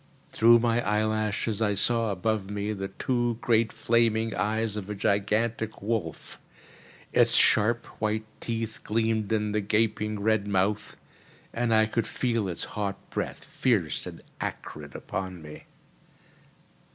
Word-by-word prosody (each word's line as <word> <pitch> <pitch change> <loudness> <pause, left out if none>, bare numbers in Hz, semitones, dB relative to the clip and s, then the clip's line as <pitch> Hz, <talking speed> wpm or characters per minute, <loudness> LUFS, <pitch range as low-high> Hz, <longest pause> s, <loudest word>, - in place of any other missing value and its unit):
Through 115 +1 +6
my 120 0 +2
eyelashes 110 0 0
I 105 -2 +2
saw 115 +3 +2
above 100 +1 -1
me 105 +1 -2
the 95 -1 -4
two 120 +1 -1
great 115 -2 +2
flaming 115 0 +2
eyes 110 +3 -1
of 105 -2 -5
a 105 - -3
gigantic 105 +3 0
wolf. 100 -6 -3 0.7
Its - - +5
sharp 110 +2 +4 0.2
white 110 0 0
teeth 115 -1 -4
gleamed 110 -1 0
in 105 -1 +1
the 105 0 0
gaping 105 0 0
red 105 -1 +1
mouth, 100 +1 0 0.6
and 120 0 0
I 110 -1 +5
could 110 +1 -1
feel 115 -5 -1
its 85 - -4
hot 100 -2 -4
breath - - -3
fierce 105 -11 0
and - - -9 0.2
acrid - - -6
upon 95 -2 -5
me. 75 -1 -11
110 Hz, 135 wpm, -27 LUFS, 100-115 Hz, 0.7 s, Through